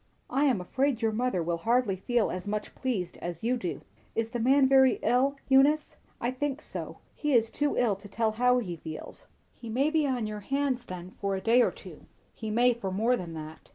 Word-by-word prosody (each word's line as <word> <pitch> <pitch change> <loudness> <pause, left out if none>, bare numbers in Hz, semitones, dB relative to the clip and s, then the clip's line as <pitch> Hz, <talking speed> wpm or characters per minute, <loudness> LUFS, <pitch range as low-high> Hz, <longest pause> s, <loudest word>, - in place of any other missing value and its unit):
"I 280 +2 +2
am 255 -8 +3
afraid 255 +6 -1
your 225 - +3
mother 225 -5 0
will 170 0 -1
hardly 230 0 +2
feel 230 +4 0
as 185 +1 -5
much 210 +1 -3
pleased 215 -9 -3
as 175 +1 -6
you 245 +2 +2
do. 185 -8 -4 0.3
Is 225 0 -1
the 240 - -3
man 265 +3 +4
very 265 -1 +5
ill, 265 +3 +3
Eunice?" 280 +3 +4 0.2
"I 240 - -1
think 280 +2 -2
so. - - -6 0.2
He 295 -2 -1
is 225 -2 +3
too 290 0 0
ill 230 -5 +2
to 200 +1 -11
tell 220 +2 0
how 250 +3 +3
he 180 -8 -3
feels." 155 0 -8 0.3
"He 235 - -10
may 270 +7 +1
be 310 -2 +2
on 250 -4 -1
your 210 0 -4
hands 270 +2 -1
then 180 0 -8
for 195 0 -2
a - - -2
day 230 +5 +4
or - - +4
two." - - -12 0.3
"He 220 - -6
may 240 +3 +4
for 225 -5 -5
more 225 +6 +2
than 170 -7 -6
that." 155 0 -9
235 Hz, 220 wpm, -28 LUFS, 200-260 Hz, 0.3 s, very